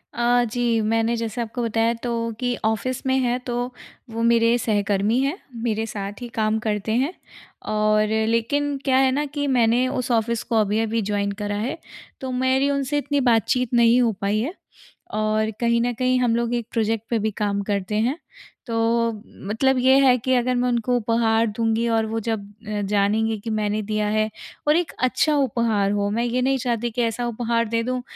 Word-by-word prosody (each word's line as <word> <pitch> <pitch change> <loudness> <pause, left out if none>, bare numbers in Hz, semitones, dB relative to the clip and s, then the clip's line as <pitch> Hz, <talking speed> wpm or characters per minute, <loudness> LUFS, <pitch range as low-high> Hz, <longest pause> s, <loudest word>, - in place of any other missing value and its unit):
अ, 240 0 +3
जी 235 0 0
मैंने 225 +1 +1
जैसा 230 +1 -3
आपको 235 +2 -4
बताया 230 0 +1
तो 240 - -2 0.3
कि 245 -1 0
ऑफिस 240 +5 -1
में 265 0 +2
है। 245 -1 +1
तो 240 - -2 0.5
वो 225 +1 -4
मेरे 230 0 +4
सहकर्मी 205 0 +1
हैं, 285 +7 -1 0.3
मेरे 225 -1 0
साथ 205 +1 -6
ही 245 - -5
काम 220 0 +1
करते 210 0 -1
हैं 320 - -3 0.6
और 215 0 +2 0.2
लेकिन 280 +6 0
क्या 260 -1 +3
है 265 0 +4
ना 290 +3 0
कि 290 0 -3
मैंने 240 +2 +3
उस 255 -2 -2
ऑफिस 230 0 +1
को 235 - -3
अभी-अभी 220 +2 0
जॉइन 200 0 0
करा 205 0 -2
है। 240 +9 -3 0.4
तो 260 -1 -4
मेरी 260 +2 +2
उनसे 280 0 0
इतनी 285 0 0
बातचीत 245 +2 +1
नहीं 235 +1 +5
हो 235 - +3
पाई 205 +2 +1
है 270 +10 -2 0.6
और 215 +1 0
कहीं 235 -1 +2
न 245 0 0
कहीं 255 +1 +1
हम 240 -2 +2
लोग 235 0 -1
एक 235 -2 -3
प्रोजेक्ट 225 -1 0
पे 230 -2 +1
भी 220 +1 -1
काम 200 -1 0
करते 200 0 -2
हैं। 240 +7 +1 0.5
तो 230 - -4 0.8
मतलब 265 +5 +2
ये 260 +2 +5
है 250 -1 +5
कि 260 +2 -1
अगर 250 +1 +1
मैं 245 0 +1
उनको 240 +1 0
उपहार 230 0 +2
दूँगी 225 +2 0
और 220 - +1
वो 225 +1 -2
जब 215 -3 -2 0.4
जानेंगे 210 +2 +1
कि 225 - -6
मैंने 215 -1 -1
दिया 210 -1 0
है 215 +1 +1 0.4
और 300 - +5
एक 345 -3 -1
अच्छा 295 +4 +2
उपहार 225 -6 +1
हो 205 0 0
मैं 230 +3 0
ये 250 +1 0
नहीं 270 +1 +2
चाहती 235 -1 -1
कि 245 +2 -2
ऐसा 230 +1 -1
उपहार 230 0 0
दे 230 0 0
दूँ 255 +1 -2
230 Hz, 190 wpm, -23 LUFS, 215-250 Hz, 0.8 s, नहीं